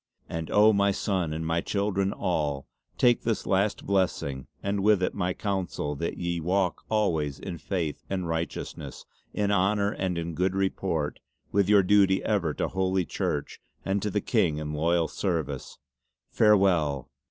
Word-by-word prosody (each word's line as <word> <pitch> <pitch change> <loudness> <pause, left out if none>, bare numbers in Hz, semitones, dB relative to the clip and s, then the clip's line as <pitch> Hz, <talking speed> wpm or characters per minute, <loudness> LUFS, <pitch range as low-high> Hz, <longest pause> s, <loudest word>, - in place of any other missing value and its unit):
"And 80 -1 -4
oh, 105 +1 +6
my 100 0 +3
sonne, 95 -4 -1
and 80 +1 -3
my 80 +1 +1
children 100 0 0
all, 75 -9 -1 0.3
take 120 -1 +4
this 115 -2 -1
my - - -4
last 100 +2 +1
blessing 90 -9 0 0.2
and 100 0 0
with 105 -2 +4
it - - 0
my 90 -2 -1
counsel 95 -7 -2
that 85 - -3
ye 85 -1 -2
walk 90 +2 0
always 80 -10 0
in 85 +2 -6
Faith 85 -7 -3
and 95 -3 -2
Righteousness, 80 +1 -4 0.3
in 105 -1 0
Honour 100 +1 +2
and 95 -4 -2
in 85 0 -3
Good 95 +3 0
Report, 95 -5 -1 0.3
with 100 -1 +2
your 100 -2 +6
duty 95 0 +4
ever 95 -7 +1
to - - -1
Holy 95 -1 0
Church 75 -1 -3 0.2
and 95 +1 0
to 105 - -1
the 105 0 -1
King 95 -11 +1
in 75 0 -4
loyal 85 +2 +2
service. 85 -6 -3 0.5
Farewell! 90 - +3
95 Hz, 165 wpm, -27 LUFS, 80-100 Hz, 0.5 s, oh